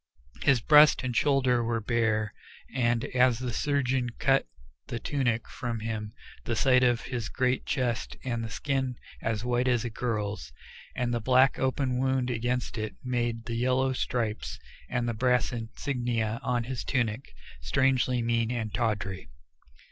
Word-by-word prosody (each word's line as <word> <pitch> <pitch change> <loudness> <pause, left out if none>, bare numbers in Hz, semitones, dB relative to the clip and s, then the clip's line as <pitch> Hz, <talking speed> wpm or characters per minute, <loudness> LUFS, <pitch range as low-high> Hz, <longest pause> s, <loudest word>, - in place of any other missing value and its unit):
His 135 -5 +4
breast 150 +2 +6
and 125 -2 -2
shoulders 130 -4 +3
were 115 0 0
bare, 110 -1 0 0.4
and 120 -2 +1
as 125 -2 +3
the 125 -1 -4
surgeon 130 -3 0
cut 135 - +2 0.4
the 120 - -3
tunic 120 -2 -1
from 115 -3 -4
him 110 -1 -4 0.3
the 115 - -2
sight 130 +1 +4
of 120 -2 +3
his 120 -3 -4
great 130 0 0
chest 125 -4 -1
and 120 -3 -2
the 110 - -4
skin, 135 +1 -1 0.3
as 110 0 -2
white 125 +1 +1
as 120 -3 +2
a 120 - -3
girl's, 105 - -3 0.4
and 120 -1 -1
the 120 - -1
black 130 +3 +4
open 130 -1 0
wound 130 -1 +1
against 120 0 -2
it 110 0 -4
made 120 -2 -1
the 120 - -4
yellow 130 +2 +1
stripes 115 -4 -2 0.3
and 120 -1 -1
the 115 - 0
brass 125 +2 +2
insignia 115 -1 -2
on 120 -1 0
the 130 +3 -4
tunic, 120 -2 -2 0.3
strangely 125 - +2
mean 115 -1 +1
and 110 -4 -3
tawdry. 100 - -2
120 Hz, 155 wpm, -28 LUFS, 115-130 Hz, 0.4 s, breast